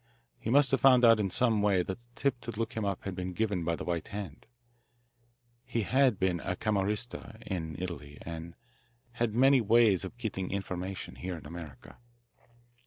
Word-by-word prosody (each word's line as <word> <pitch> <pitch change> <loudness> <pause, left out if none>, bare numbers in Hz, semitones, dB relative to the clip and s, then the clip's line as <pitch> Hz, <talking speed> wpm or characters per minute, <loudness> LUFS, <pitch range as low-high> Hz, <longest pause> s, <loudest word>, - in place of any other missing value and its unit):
He - - -4
must 140 +3 +5
have 135 -4 +2
found 125 -2 +7
out 115 -1 +7
in 100 -2 0
some 110 +2 +2
way 100 -3 +3
that 95 +5 -5
the 120 - -29
tip 135 -3 0
to 120 - -8
look 115 +1 -3
him 110 - -2
up 100 -2 -2
had 100 - -4
been 90 0 -4
given 100 -3 -1
by 85 0 0
the - - -6
White 85 -2 -2
Hand. 100 -7 -7 1.2
He 115 - -2
had 130 0 +3
been 90 -2 +1
a 90 - -3
Camorrista, 105 +2 -2
in 80 -5 -4
Italy, 75 -5 -6
and 85 0 -7 0.6
had 120 -2 -1
many 135 +1 +5
ways 110 -4 +4
of 95 +5 -7
getting 100 -6 -3
information 95 -1 -4
here 90 -1 -4
in 80 - -12
America." 75 -5 -10
100 Hz, 180 wpm, -30 LUFS, 90-115 Hz, 1.2 s, found